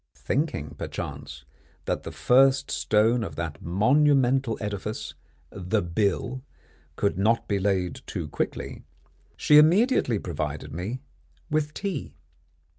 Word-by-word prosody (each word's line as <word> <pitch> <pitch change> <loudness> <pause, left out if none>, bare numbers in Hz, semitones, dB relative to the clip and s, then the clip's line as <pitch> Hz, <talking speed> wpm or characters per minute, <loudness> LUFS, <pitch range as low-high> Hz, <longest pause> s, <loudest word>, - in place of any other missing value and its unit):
Thinking, 130 - -2
perchance, 70 -1 -6 0.4
that - - -1
the - - -7
first 135 +2 +3
stone 110 +3 +2
of 85 -8 -6
that 80 -2 -5
monumental 130 - +3
edifice, 105 +1 -4 0.4
the 90 -3 -1
bill, 100 +8 -1 0.5
could 100 -2 0
not 115 +4 +2
be 100 -1 0
laid 95 -3 -1
too - - -4
quickly, - - -4 0.6
she 150 0 +6
immediately 175 - +4
provided 75 -6 -4
me 105 +10 -4 0.5
with 150 -1 0
tea. 195 -8 -4
110 Hz, 115 wpm, -26 LUFS, 90-135 Hz, 0.6 s, she